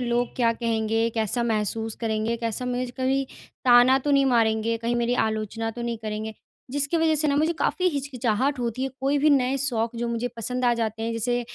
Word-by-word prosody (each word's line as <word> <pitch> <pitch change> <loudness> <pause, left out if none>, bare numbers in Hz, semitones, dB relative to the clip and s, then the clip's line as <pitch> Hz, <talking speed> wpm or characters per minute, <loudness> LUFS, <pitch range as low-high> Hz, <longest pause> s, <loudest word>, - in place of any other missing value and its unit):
लोग 240 0 -1
क्या 235 -2 +3
कहेंगे, 225 -1 0
कैसा 225 +2 0
महसूस 220 -1 -1
करेंगे, 220 0 -1
कैसा 230 +1 -3
मुझे 250 0 -1
कभी 270 +1 +1 0.4
ताना 250 +1 +6
तो 290 +2 -2
नहीं 275 -1 +4
मारेंगे, 230 -2 +2
कहीं 230 +1 -1
मेरी 240 +1 +1
आलोचना 220 +1 -3
तो 240 +2 -7
नहीं 235 -1 -3
करेंगे, 215 0 -4 0.4
जिसकी 285 +4 0
वजह 320 -1 +3
से 305 0 +2
ना 280 - +1
मुझे 315 +3 +2
काफ़ी 370 - +1
हिचकिचाहट 270 -3 -1
होती 240 +1 -2
है। 270 - 0
कोई 275 +2 +1
भी 300 +2 +3
नए 270 -1 +3
शौक़ 235 -3 -1
जो 235 0 -2
मुझे 235 +1 -2
पसंद 250 +3 -3
आ 240 - +4
जाते 225 -1 -2
हैं, 230 +1 -1
जैसे 240 +2 0
240 Hz, 205 wpm, -25 LUFS, 225-265 Hz, 0.4 s, ताना